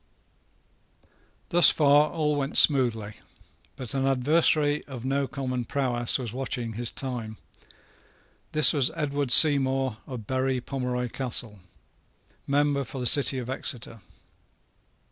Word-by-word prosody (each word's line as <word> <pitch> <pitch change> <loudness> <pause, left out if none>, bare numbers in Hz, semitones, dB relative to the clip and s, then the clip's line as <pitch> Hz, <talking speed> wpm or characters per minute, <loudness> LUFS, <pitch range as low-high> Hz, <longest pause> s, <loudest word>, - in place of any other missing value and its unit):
Thus 175 -3 +5
far 150 0 +3
all 150 -3 -2
went 140 0 -2
smoothly. 115 -7 +2 0.6
But 130 0 -8
an 135 0 -1
adversary 145 +2 +1
of 130 -3 -9
no 135 +1 -1
common 130 -1 -5
prowess 120 -3 -1
was 120 -5 -7
watching 125 -3 -5
his 120 +2 -2
time. 120 -5 -7 1.1
This 155 0 +5
was 140 -4 +1
Edward 145 -2 -3
Seymour 135 -4 +5
of 125 -5 -8
Berry 130 +1 -2
Pomeroy 125 -1 -4
Castle, 115 -4 -4 0.9
member 145 0 0
for 135 - -10
the 125 - -4
city 135 +1 +3
of 125 -2 -6
Exeter. 120 -4 -5
130 Hz, 120 wpm, -25 LUFS, 125-140 Hz, 1.1 s, Thus